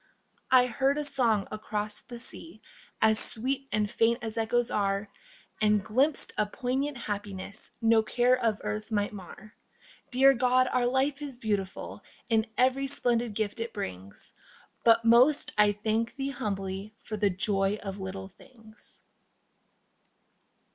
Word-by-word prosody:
I 255 -1 +6
heard 270 +4 +1
a 300 - -1
song 240 -8 +1
across 210 0 -4
the 245 -1 -10
sea 235 0 -7 0.4
As 220 0 +5
sweet 265 +4 -1
and 210 0 +1
faint 230 +3 +1
as 220 -1 -4
echoes 230 +1 +1
are, 200 0 0 0.5
And 210 -2 +3
glimpsed 265 +7 +2
a 210 - +2
poignant 265 +5 -2
happiness 205 -2 -5
No 225 0 +5
care 245 +3 +2
of 220 -3 +1
earth 215 +1 -4
might 205 0 0
mar. 205 +2 -11 0.6
Dear 270 +2 +6
God, 255 0 +3
our 245 -1 +2
life 270 +3 0
is 280 -4 -6
beautiful 205 -5 -3 0.3
In 225 -1 +2
every 260 +2 +2
splendid 240 -5 0
gift 215 +2 -2
it 230 0 -4
brings, 95 - -6 0.5
But 230 0 +5
most 250 +6 +5
I 210 -1 +5
thank 220 +3 -1
Thee 275 0 -3
humbly 195 -3 -4
for 215 - -6
The 205 -1 +2
joy 195 +2 +1
of 195 0 -5
little 190 0 -6
things. 220 0 -18
220 Hz, 140 wpm, -28 LUFS, 205-250 Hz, 0.6 s, I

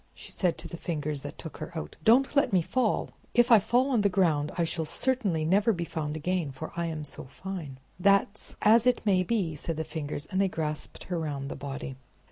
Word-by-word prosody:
she - - -10
said 180 -3 0
to - - -6
the 170 - -7
Fingers 150 -4 -3
that - - -8
took - - -8
her - - -6
out. 75 - -5
"Don't 260 - +5
let 280 - +4
me 185 -3 +3
fall! 240 +3 0 0.2
If 240 +1 +5
I 225 - +9
fall 245 +6 +2
on 235 -5 +3
the 200 - +3
ground 160 -6 +2
I 170 - +2
shall 165 0 -1
certainly 195 -4 0
never 200 +7 +4
be 170 -2 -3
found 155 -2 -3
again, 175 0 -1
for 135 +4 -7
I 170 0 -1
am 155 -2 -4
so 140 - -9
fine!" 155 -1 -7 0.2
"That's 200 +2 +2
as 225 +3 +6
it 245 -2 +2
may 190 -3 +4
be," 185 -4 0
said 160 +2 -4
the 160 - -1
Fingers; 150 -2 -5
and 190 - +2
they 195 - +3
grasped 155 -3 -4
her 180 -2 -3
round 140 -3 -3
the - - -5
body. 135 -1 -6
170 Hz, 225 wpm, -28 LUFS, 150-205 Hz, 0.2 s, I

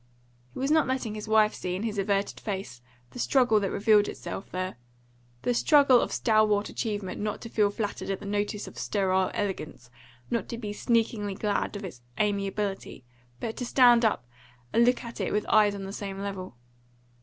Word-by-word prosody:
He - - -11
was 270 +3 0
not 315 -3 +4
letting 260 -4 -2
his 215 0 -6
wife 215 -1 +4
see 180 0 -4
in 190 - -4
his 215 -3 -2
averted 200 0 0
face 190 - -5 0.3
the - - -9
struggle 245 -4 +3
that 195 -2 -1
revealed 210 0 +4
itself 195 - -6
there 185 -2 -4 0.7
the 245 - +1
struggle 275 -1 +5
of - - -2
stalwart 215 -2 +2
achievement 205 -5 -3
not 210 0 -2
to 230 - -7
feel 210 -2 +2
flattered 205 -1 -4
at 195 - -2
the 205 - -10
notice 205 +1 -2
of - - -10
sterile 190 -2 +1
elegance, 170 - -4 0.4
not 235 - -1
to 235 - -4
be 210 -3 -5
sneakingly 220 -3 0
glad 205 +1 -1
of 205 0 -5
its 130 -10 -9 0.2
amiability, 200 -7 -2 0.3
but 225 - -4
to - - -3
stand 240 -1 +5
up 215 - +1 0.5
and 235 - +5
look 250 +2 +2
at 235 -1 -7
it - - -1
with 210 0 0
eyes 210 -1 +4
on 195 - -6
the 195 +1 -6
same 195 -2 -5
level. 195 -8 -6
210 Hz, 190 wpm, -27 LUFS, 195-230 Hz, 0.7 s, struggle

